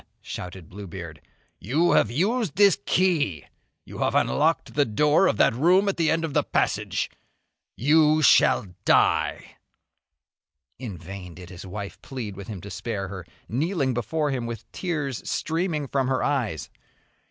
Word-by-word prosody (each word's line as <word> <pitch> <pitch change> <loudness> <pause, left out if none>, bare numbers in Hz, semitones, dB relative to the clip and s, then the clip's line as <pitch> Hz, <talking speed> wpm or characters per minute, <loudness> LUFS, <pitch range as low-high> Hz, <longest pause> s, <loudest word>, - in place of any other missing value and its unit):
shouted 90 -2 -7
Bluebeard, 90 -5 -9 0.4
"you 155 - +1
have - - +4
used 195 - 0
this 200 0 +5
key, 155 - +1 0.4
you - - -10
have - - 0
unlocked 160 +3 +1
the 145 - +3
door 150 - +3
of 110 - +1
that - - +4
room 180 - +3
at 195 - 0
the 165 -2 +2
end 165 0 +1
of 155 - -5
the - - +3
passage. - - -1 0.6
You 155 +4 +4
shall 125 - +5 0.2
die!!!" - - +2 1.2
In 110 -8 -6
vain 90 +1 -9
did 90 +1 -11
his 90 +1 -9
wife 100 +1 -7
plead 115 -7 -6
with 100 0 -9
him 100 -5 -7
to 100 - -9
spare 95 +1 -4
her, 90 -3 -8 0.2
kneeling 140 - 0
before 145 +5 -1
him 125 -3 -2
with 115 -2 -8
tears 145 - -3
streaming 160 -3 -1
from 135 -1 0
her 130 -1 0
eyes. 120 - -1
130 Hz, 155 wpm, -25 LUFS, 100-160 Hz, 1.2 s, this